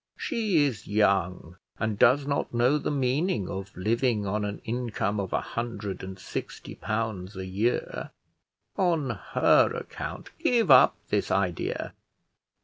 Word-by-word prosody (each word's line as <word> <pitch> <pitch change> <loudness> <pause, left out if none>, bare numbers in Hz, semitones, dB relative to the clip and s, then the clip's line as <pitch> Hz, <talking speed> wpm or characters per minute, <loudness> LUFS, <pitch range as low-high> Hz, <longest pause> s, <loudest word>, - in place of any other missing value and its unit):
She 215 - +1
is 115 -7 -4
young, 95 -4 +1 0.2
and 110 -1 -2
does 135 +4 +5
not 140 -3 -2
know 125 +5 +3
the - - -2
meaning 135 - 0
of 95 +1 -5
living 110 +2 +1
on 105 +2 -1
an 105 0 -3
income 115 -3 -2
of 95 -2 -3
a - - +1
hundred 115 -4 -4
and 95 0 -7
sixty 95 - -6
pounds 110 -4 -3
a 95 0 -5
year. 100 +6 -1 0.7
On 165 -8 +1
her 100 -6 +3
account - - -6
give 235 -2 +3
up - - +8
this - - 0
idea. - - -1
110 Hz, 140 wpm, -27 LUFS, 100-135 Hz, 0.7 s, up